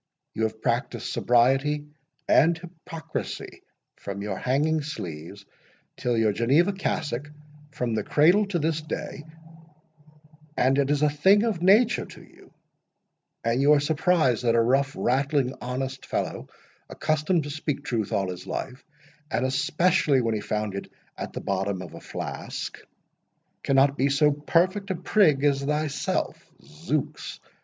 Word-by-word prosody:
You 110 Hz, -, -2 dB
have 110 Hz, 0 st, -5 dB
practised -, -, -1 dB
sobriety 135 Hz, +5 st, +2 dB, 0.4 s
and 165 Hz, +2 st, +4 dB
hypocrisy 165 Hz, -2 st, -7 dB, 0.4 s
from 100 Hz, 0 st, -6 dB
your 105 Hz, -2 st, -3 dB
hanging 150 Hz, +8 st, +1 dB
sleeves 95 Hz, -, -7 dB, 0.5 s
till 120 Hz, -1 st, -1 dB
your 110 Hz, -2 st, +3 dB
Geneva 140 Hz, -, +3 dB
cassock—from 150 Hz, -5 st, -4 dB
the 110 Hz, -1 st, -1 dB
cradle 175 Hz, -, +4 dB
to 195 Hz, -3 st, -1 dB
this 160 Hz, 0 st, 0 dB
day,—and 155 Hz, -2 st, -6 dB
it 140 Hz, -1 st, +1 dB
is 145 Hz, 0 st, +1 dB
a 150 Hz, -, +5 dB
thing 190 Hz, +8 st, +4 dB
of 215 Hz, -7 st, -1 dB
nature 215 Hz, +6 st, +4 dB
to -, -, -13 dB
you; -, -, -19 dB, 0.9 s
and 115 Hz, +3 st, +1 dB
you 145 Hz, +2 st, +6 dB
are 150 Hz, -, +5 dB
surprised 155 Hz, -4 st, +2 dB
that 115 Hz, -1 st, +3 dB
a -, -, +4 dB
rough, 135 Hz, +4 st, +2 dB
rattling, 135 Hz, +1 st, +1 dB
honest 130 Hz, +1 st, -4 dB
fellow, -, -, -3 dB, 0.4 s
accustomed 155 Hz, +2 st, 0 dB
to 145 Hz, -, -6 dB
speak 150 Hz, -2 st, -3 dB
truth 110 Hz, -5 st, -2 dB
all 95 Hz, -2 st, 0 dB
his 90 Hz, -, -9 dB
life, 130 Hz, 0 st, -5 dB, 0.5 s
and 125 Hz, -, 0 dB
especially 150 Hz, +2 st, +2 dB
when 115 Hz, -2 st, 0 dB
he 105 Hz, -, -2 dB
found 105 Hz, -1 st, -2 dB
it 100 Hz, -, -6 dB, 0.2 s
at -, -, -6 dB
the -, -, -5 dB
bottom 95 Hz, -1 st, -2 dB
of 85 Hz, -, -11 dB
a -, -, -10 dB
flask, -, -, -6 dB, 0.8 s
cannot 135 Hz, +1 st, +3 dB
be 135 Hz, +2 st, +3 dB
so 150 Hz, +2 st, +4 dB
perfect 175 Hz, +7 st, +1 dB
a 190 Hz, -, 0 dB
prig 170 Hz, -5 st, +3 dB
as 140 Hz, -1 st, +3 dB
thyself—Zooks! 150 Hz, -, -3 dB
145 Hz, 140 wpm, -26 LUFS, 125-160 Hz, 0.9 s, you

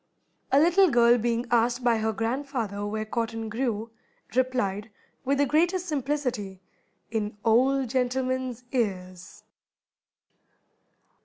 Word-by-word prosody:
A 275 Hz, -, +5 dB
little 350 Hz, +4 st, +5 dB
girl 240 Hz, -2 st, +5 dB
being 235 Hz, +1 st, 0 dB
asked 240 Hz, +1 st, +2 dB
by 235 Hz, -2 st, +3 dB
her 220 Hz, 0 st, 0 dB
grandfather 225 Hz, -2 st, -3 dB
where 215 Hz, +1 st, -3 dB
cotton 225 Hz, 0 st, -3 dB
grew, 225 Hz, -1 st, -2 dB, 0.4 s
replied, 225 Hz, -5 st, 0 dB, 0.4 s
with 275 Hz, +2 st, +1 dB
the 285 Hz, -, +3 dB
greatest 345 Hz, +6 st, +1 dB
simplicity, 265 Hz, -, -2 dB, 0.5 s
"In 210 Hz, -2 st, -3 dB
old 260 Hz, +3 st, +3 dB
gentlemen's 255 Hz, -1 st, -1 dB
ears." 185 Hz, -7 st, -3 dB
240 Hz, 105 wpm, -26 LUFS, 220-265 Hz, 0.5 s, A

